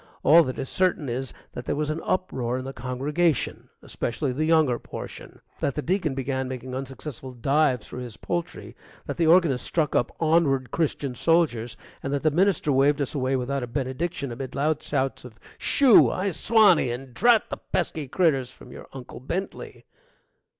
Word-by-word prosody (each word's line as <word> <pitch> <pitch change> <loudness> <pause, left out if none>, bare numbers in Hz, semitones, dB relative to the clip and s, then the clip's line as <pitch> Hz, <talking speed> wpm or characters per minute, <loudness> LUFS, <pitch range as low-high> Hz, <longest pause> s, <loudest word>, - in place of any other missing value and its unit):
All 165 +3 +8
that 130 - -4
is 135 - -4
certain 180 -4 0
is 130 +2 -3 0.2
that 120 - -7
there - - -1
was 150 +1 -1
an 155 - -4
uproar 130 -10 -1
in 130 - -5
the 135 - -6
congregation, 140 +6 -1
especially 130 +4 -2
the 155 +5 -1
younger 155 -7 +3
portion; - - -9 0.2
that 140 - -1
the 150 - -3
Deacon 170 -6 0
began 130 0 -2
making 130 0 -6
unsuccessful 135 0 -7
dives 135 0 +1
for 125 - -8
his 120 -3 -7
poultry; 175 -1 -4 0.3
that - - -5
the 165 - +2
organist 160 -7 +4
struck 155 -4 -1
up 120 - +1
"Onward, 155 -5 +2
Christian 145 -4 -1
Soldiers," 125 -6 +1 0.2
and 135 - -4
that 140 -1 -1
the 155 - +3
minister 180 -2 +2
waved 140 +2 +3
us 140 - -2
away 135 -2 0
without 130 +2 -1
a 125 - -4
benediction 135 +3 -3
amid 130 +2 -6
loud 150 +2 0
shouts 135 -2 -2
of, 125 -3 -11 0.2
"Shoo!" 270 -6 +5
"I 195 +1 -1
swanny!" 200 - +4
and, 125 +1 -6
"Drat 230 - +3
the - - -3
pesky 150 -3 -3
critters!" 135 -5 +1
from - - -15
your - - -11
Uncle 130 -2 -9
Bentley. 175 +10 -5
140 Hz, 180 wpm, -25 LUFS, 130-165 Hz, 0.3 s, All